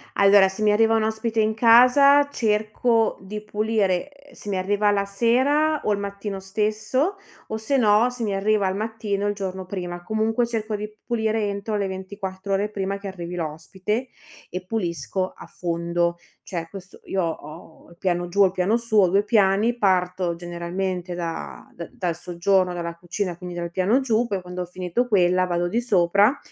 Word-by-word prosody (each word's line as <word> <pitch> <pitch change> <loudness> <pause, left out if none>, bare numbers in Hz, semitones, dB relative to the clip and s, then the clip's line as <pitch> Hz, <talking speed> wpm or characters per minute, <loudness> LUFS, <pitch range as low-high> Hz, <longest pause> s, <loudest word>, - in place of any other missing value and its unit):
Allora, 200 -1 +6
se 190 +3 -7
mi 210 -1 +4
arriva 225 +1 +4
un 220 - +2
ospite 220 +1 -1
in 215 0 +2
casa 255 +6 +6
cerco 220 -1 +1
di 210 +2 -6
pulire: 210 0 0
ehm, 285 0 -20
se 205 - -9
mi 195 - -1
arriva 205 +2 +1
la 200 -1 +1
sera 260 +9 +2
o 210 - +2
il 200 - -2
mattino 200 0 -5
stesso 215 - -1 0.3
o 220 - -3
se 220 +6 0
no 220 0 +4
se 245 -1 -5
mi 205 -2 -1
arriva 205 0 +2
al 190 - -1
mattino 210 -1 -2
il 205 - 0
giorno 190 -2 -5
prima. 175 -2 -5
Comunque 220 +4 0
cerco 220 -2 -3
di 210 +1 -5
p 215 - -26
pulire 220 -1 +1
entro 200 +2 -3
le 200 -1 -1
24 190 0 -5
ore 200 +2 0
prima 195 -1 -3
che 200 0 -8
arrivi 175 -2 -6
l'ospite 185 +9 -3 0.4
e 180 +1 -6
pulisco 185 - -2
a - - -12
fondo. 170 0 -1 0.3
Cioè 170 -3 -5
questo 190 +1 -11
io 190 -1 -1
ho 160 0 -7
il 170 - -17
piano 175 -2 -1
giù, 200 +4 +1
ho 195 - +8
il - - -4
piano 185 +4 +1
su, 230 -2 -1
ho 190 -3 +6
2 200 +3 +3
piani, 210 +2 +2
parto 180 -3 +1
generalmente 175 +1 -4
da 75 - -5
d - - -8
dal 175 -2 -2
soggiorno, 180 +1 +1
dalla 170 -1 -4
cucina, 175 +1 -4
quindi 180 0 -7
dal 170 -1 -4
piano 190 +8 +2
giù, 235 -2 +1
poi 195 -3 -2
quando 180 0 -6
ho - - -7
finito 180 +7 -2
quella 185 -4 +3
vado 175 0 -1
di 230 +6 0
sopra 200 +3 +3
200 Hz, 190 wpm, -23 LUFS, 180-220 Hz, 0.4 s, ho